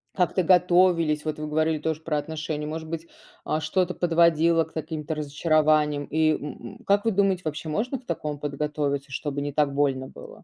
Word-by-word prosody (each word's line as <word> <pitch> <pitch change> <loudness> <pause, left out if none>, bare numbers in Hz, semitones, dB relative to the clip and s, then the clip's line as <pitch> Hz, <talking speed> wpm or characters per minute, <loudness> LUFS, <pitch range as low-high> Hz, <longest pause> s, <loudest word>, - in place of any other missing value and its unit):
как-то 180 0 +1
готовились? 175 -4 +3
Вот 155 -1 -3
вы 155 - -4
говорили 155 0 +1
тоже 160 0 -2
про 155 -2 -1
отношения. 150 0 -4
Может 160 +1 -5
быть, 165 0 -5 0.4
а, 155 - 0
что-то 180 +3 0
подводило 170 -1 +3
к 160 - -15
каким-то 160 0 -4
разочарованиям? 150 -1 +2
И 155 0 +2
м 145 -2 -7 0.2
м, - - -13
как 200 +2 +2
вы 225 - +3
думаете, 195 -2 +2
вообще 155 +1 -4
можно 235 - -1
к 255 - -23
такому 150 -3 -3
подготовиться, 145 -1 -2
чтобы 145 0 -3
не 145 0 -3
так 145 -1 +1
больно 135 -2 0
было? - - -13
155 Hz, 185 wpm, -25 LUFS, 150-170 Hz, 0.4 s, готовились